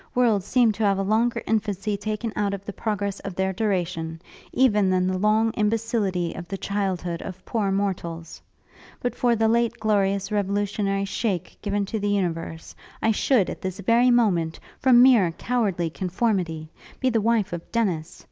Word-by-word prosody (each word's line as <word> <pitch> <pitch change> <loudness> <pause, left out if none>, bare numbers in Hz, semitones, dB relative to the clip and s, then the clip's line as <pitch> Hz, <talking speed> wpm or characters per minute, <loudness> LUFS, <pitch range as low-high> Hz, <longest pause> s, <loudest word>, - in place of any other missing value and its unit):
Worlds 225 -6 +2
seem 245 -3 +4
to 215 +1 -3
have 200 -2 +3
a 195 - 0
longer 225 +4 +1
infancy 210 -1 -1
taken 215 +2 -3
out 200 -1 0
of 200 0 -11
the 205 - -6
progress 200 -2 -2
of 195 -2 -7
their 190 0 0
duration, 175 -5 -2 0.3
even 210 -7 +3
than 185 0 +2
the 185 0 0
long 215 +2 +3
imbecility 210 -5 0
of 175 0 -8
the 195 - -4
childhood 185 -4 -2
of 185 -1 -8
poor 210 -4 -1
mortals. 175 -4 -3 0.6
But 245 - -2
for 240 -1 +2
the 225 0 +2
late 235 +1 +1
glorious 200 -2 +1
revolutionary 200 -1 0
shake 195 -3 -2
given 205 -1 -1
to 220 +2 -3
the 205 0 -1
universe, 165 -4 -2 0.3
I 225 - +2
should, 220 -2 +2
at - - -6
this 185 +1 -4
very 235 +5 +4
moment, 185 -10 +2 0.2
from 250 -2 +6
mere 220 -10 +5
cowardly 195 -8 -1
conformity, 180 -4 -1 0.3
be 260 -1 +1
the 225 -2 +1
wife 220 -4 +1
of 170 -1 -7
Dennis! 180 -9 -1
200 Hz, 170 wpm, -24 LUFS, 185-225 Hz, 0.6 s, from